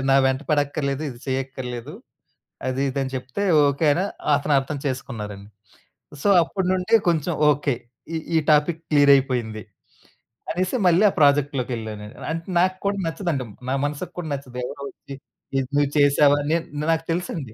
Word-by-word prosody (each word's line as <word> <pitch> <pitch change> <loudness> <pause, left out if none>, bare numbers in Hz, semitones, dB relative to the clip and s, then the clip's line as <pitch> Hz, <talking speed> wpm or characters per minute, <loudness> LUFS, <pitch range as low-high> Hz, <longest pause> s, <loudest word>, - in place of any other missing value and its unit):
నా 135 - +6
వెంట 130 +1 0
పడక్కర్లేదు. 145 -1 0
ఇది 120 - -11
చేయక్కర్లేదు. 130 -2 -4 0.7
అది, 130 +1 -1
ఇది 135 +1 -3
అని 130 - -5
చెప్తే, 130 +9 -4 0.2
"ఓకే." 140 +3 0
అనా 175 - 0 0.2
అని - - +2
అతను 150 0 0
అర్థం 140 +2 -4
చేసుకున్నారండి. 105 -6 -5 0.8
సో, - - +3
అప్పటి 190 +2 -3
నుండి 185 +4 +2
కొంచెం, 170 +1 0 0.2
ఓకే. 140 -2 0 0.4
ఈ - - +1 0.2
ఈ - - +5
టాపిక్ 150 +2 +3
క్లియర్ 145 -2 +5
అయిపోయింది 125 -5 -1 0.9
అనేసి, 185 +5 -1
మళ్ళీ 175 +3 +4
ఆ - - -3
ప్రాజెక్ట్‌లోకి 140 -3 +3
వెళ్లానండి. 105 -2 -7 0.2
అంటే 165 +1 -4
నాకు 185 +1 +2
కూడా 200 0 +1
నచ్చదండి. 165 -6 -2 0.2
నా 135 - +1
మనసుకి 145 +5 -4
కూడా 165 -3 -5
నచ్చదు. 135 -3 -7
ఎవరో 140 +2 -8
వచ్చి, 140 - -11 0.4
"ఇది 135 - +1
నువ్వు 145 -1 +3
చేసావా?" 145 0 +5
నే 165 - +4 0.3
నాకు 165 0 0
తెలుసండి. 165 -8 -3
140 Hz, 155 wpm, -23 LUFS, 130-160 Hz, 0.9 s, నా